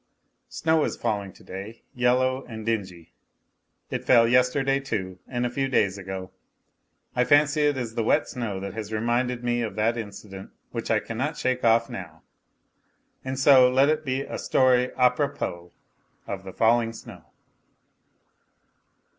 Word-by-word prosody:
Snow 160 -1 +1
is - - -2
falling 100 -2 -2
to - - -18
day, 100 +5 -9
yellow 130 +2 +1
and 110 -2 -8
dingy. 95 -7 -3 0.8
It - - -3
fell 115 -2 +5
yesterday, 130 +3 +2
too, 95 -9 -4
and 125 -1 -2
a - - 0
few 135 +2 -1
days 100 -7 +1
ago. 95 -1 -6 0.8
I 125 - +3
fancy 145 +3 +4
it 145 -2 0
is 120 -3 -4
the 115 -1 -1
wet 145 +7 +2
snow 115 -7 -4
that 100 - -5
has 110 -1 -6
reminded 120 +2 -1
me 120 0 0
of 110 -4 -4
that 110 +2 +1
incident 100 -3 -8 0.2
which - - -5
I - - +3
cannot 130 +7 -4
shake 130 0 -1
off 115 0 +4
now. 85 -4 -9 1.0
And 130 0 -4
so 135 -2 +6
let 135 +3 +4
it 155 0 0
be 135 -1 -1
a - - -6
story 125 -1 +3
a 125 -1 +5
propos 90 -10 -3 0.6
of 95 -1 -6
the 95 - -8
falling 115 0 +2
snow. - - -12
120 Hz, 155 wpm, -25 LUFS, 105-130 Hz, 1.0 s, so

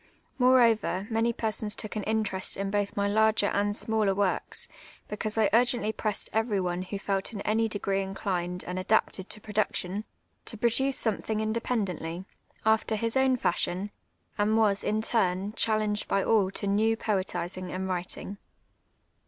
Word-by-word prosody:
Moreover, 235 -6 +4
many 225 +1 +2
persons 215 -2 -2
took 215 - -6
an 215 - -1
interest 215 -4 0
in 195 0 -2
both 205 0 -1
my 200 0 +2
larger 220 0 +3
and 205 0 +1
smaller 215 -3 +1
works, 200 -2 0 0.4
becau.se 215 0 +1
I - - +7
ur<;ently 240 -2 +2
])ressed 215 -2 -2
ever}' 220 -3 +1
one 175 0 -1
who 190 +2 -5
felt 195 +2 -2
in 200 - -5
any 225 +2 +1
dep 205 -1 -4
ce 195 0 +1
inclined 185 -2 -3
and 180 +1 -3
ada])ted 190 -1 +1
to 215 - -5
production, 210 -2 -2 0.4
to 225 - -6
j)roduce 250 +5 +2
somethinu; 220 0 -1
in 220 0 -1
dependently, 190 -7 -2 0.4
after 220 0 +3
his 230 +2 -1
own 265 -1 +3
fashion, 185 -1 -1 0.5
and 215 +2 +3
was, 205 -3 +3
in 215 +1 0
tuni, 195 -2 0
chal 220 -1 +2
leuijed 210 -1 -1
by 195 -1 +1
all 210 -4 +3
to 195 - -5
new 215 +3 +2
poetisin*; 185 -3 -2
and 190 +1 -3
writin«j. 185 +2 -4
210 Hz, 160 wpm, -28 LUFS, 195-220 Hz, 0.5 s, I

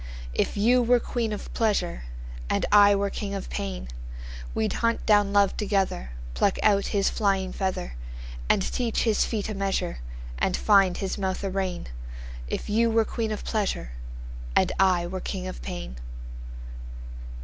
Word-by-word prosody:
If 65 - 0
you 240 +5 +5
were 245 +1 +4
queen 230 -2 -2
of 210 - -5
pleasure, 205 - 0 0.4
And - - +1
I 205 0 +8
were 200 0 0
king 200 -1 -3
of 195 - -5
pain, 60 -2 -3 0.7
We'd 110 - +1
hunt 230 0 +1
down 205 -2 +5
love 200 -1 +4
together, 195 - 0 0.2
Pluck - - +2
out 200 -2 +4
his 200 -1 +2
flying 195 -3 +1
feather, 190 - -2 0.6
And 190 - +4
teach 235 +1 0
his 220 -3 +3
feet 215 -3 -2
a 215 - -3
measure, 195 - -1 0.4
And 185 - +2
find 195 -4 +5
his 195 0 -2
mouth 190 0 -1
a 195 - -1
rein; 190 -2 -2 0.6
If - - -3
you 230 +2 +3
were 225 0 +3
queen 225 -1 -2
of 215 - -3
pleasure. 200 - -1 0.6
And - - +4
I 185 -3 +4
were 185 +2 -4
king 185 -2 -4
of 185 - -6
pain. 175 - -6
200 Hz, 160 wpm, -26 LUFS, 185-215 Hz, 0.7 s, I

